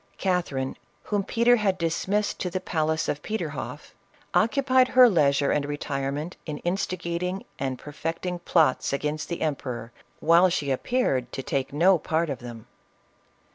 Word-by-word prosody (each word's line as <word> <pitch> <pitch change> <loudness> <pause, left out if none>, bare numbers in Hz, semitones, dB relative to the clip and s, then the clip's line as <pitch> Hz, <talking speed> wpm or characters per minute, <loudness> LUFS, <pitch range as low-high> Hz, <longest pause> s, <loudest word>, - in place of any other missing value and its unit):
Catherine, 170 -8 -1 0.3
whom 205 -2 -1
Peter 235 +4 +3
had 195 -4 +1
dismissed 190 +5 -1
to 180 - -2
the 185 - -2
palace 160 -3 -1
of 145 - -2
Petorhoff, 220 +6 -5 0.4
occupied 255 +2 +3
her 255 -1 +7
leisure 145 -8 +3
and 150 - +1
retirement 145 +2 -3
in 150 -1 -3
in 175 +2 +2
ng 180 0 -3
and 130 -1 -2
perfecting 165 +5 -4
plots 160 -6 +2
against 150 +2 -2
the 170 - -4
emperor, 125 -6 -3 0.3
while 170 +3 +5
she 145 -5 -1
appeared 130 - 0
to 135 - -4
take 135 0 -1
part - - -18
in 175 +3 +3
none 160 +1 +1
of 135 - -4
them. 120 -2 -9
165 Hz, 150 wpm, -26 LUFS, 140-185 Hz, 0.4 s, her